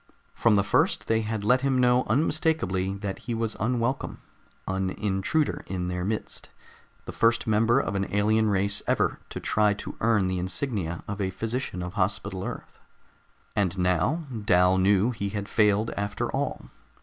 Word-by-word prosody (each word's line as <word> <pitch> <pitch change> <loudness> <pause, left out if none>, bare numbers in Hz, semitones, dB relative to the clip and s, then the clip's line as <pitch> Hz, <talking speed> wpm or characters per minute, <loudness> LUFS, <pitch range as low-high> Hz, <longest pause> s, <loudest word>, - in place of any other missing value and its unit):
From 115 -3 +3
the 100 - +3
first - - +1
they 110 0 +1
had 110 -1 -3
let 125 +5 +3
him 135 -1 +1
know 125 0 +4
unmistakably 120 - 0
that 100 -1 -5
he 115 +1 -4
was 115 -1 -2
unwelcome, 120 +4 -1 0.5
an 95 0 -1
intruder 105 +11 0
in 90 -1 -3
their 90 0 -3
midst, 105 +3 -4 0.6
the - - -6
first 115 +1 +2
member 115 +3 +3
of 135 - -2
an 100 0 -2
alien 110 +2 +2
race 100 0 +1
ever - - +1
to - - -6
try 105 -1 +2
to - - -7
earn 110 -4 +3
the 95 0 -1
insignia 95 - -2
of 105 0 -4
a 95 - 0
physician 110 -1 -3
of 90 +1 -6
Hospital 95 -1 -1
Earth. - - -7 0.8
And 95 -2 0
now, 90 - +1 0.2
Dal 90 -1 +4
knew 100 +4 +3
he 100 -4 -3
had 100 0 -4
failed 105 0 +2
after 100 +1 -3
all. - - -3
105 Hz, 165 wpm, -26 LUFS, 95-115 Hz, 0.8 s, know